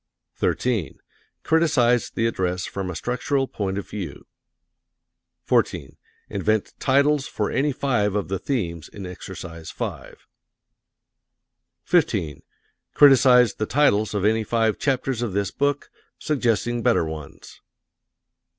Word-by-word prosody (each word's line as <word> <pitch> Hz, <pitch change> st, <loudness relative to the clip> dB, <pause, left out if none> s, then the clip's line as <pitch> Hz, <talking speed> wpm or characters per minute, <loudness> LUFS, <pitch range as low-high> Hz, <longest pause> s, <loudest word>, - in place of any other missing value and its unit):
13. 115 Hz, -, -1 dB, 0.5 s
Criticise 145 Hz, -7 st, +2 dB
the 115 Hz, -, -1 dB
address 90 Hz, -5 st, -1 dB
from 95 Hz, -2 st, -4 dB
a 90 Hz, -, -5 dB
structural 125 Hz, -, -1 dB
point 95 Hz, -4 st, -3 dB
of 100 Hz, -, -5 dB
view. 90 Hz, -10 st, -7 dB, 1.2 s
14. -, -, 0 dB, 0.3 s
Invent 105 Hz, +2 st, -1 dB
titles 140 Hz, +1 st, +2 dB
for 105 Hz, -, -2 dB
any 145 Hz, +2 st, +1 dB
five 120 Hz, -7 st, 0 dB
of 105 Hz, -, -1 dB
the 95 Hz, 0 st, -3 dB
themes 85 Hz, -, -3 dB
in 100 Hz, -2 st, -9 dB
Exercise 85 Hz, -2 st, -8 dB
5. -, -, -7 dB, 1.6 s
15. 75 Hz, -3 st, +1 dB, 0.5 s
Criticise 130 Hz, -4 st, +6 dB
the 110 Hz, -, -3 dB
titles 110 Hz, -6 st, +2 dB
of 100 Hz, -1 st, 0 dB
any 110 Hz, +1 st, +2 dB
five 110 Hz, 0 st, 0 dB
chapters 130 Hz, -3 st, -1 dB
of 115 Hz, -6 st, -2 dB
this 100 Hz, -1 st, -1 dB
book, 145 Hz, 0 st, -1 dB, 0.3 s
suggesting 120 Hz, -4 st, 0 dB
better 115 Hz, -8 st, +2 dB
ones. 80 Hz, -3 st, -9 dB
110 Hz, 115 wpm, -23 LUFS, 95-130 Hz, 1.6 s, Criticise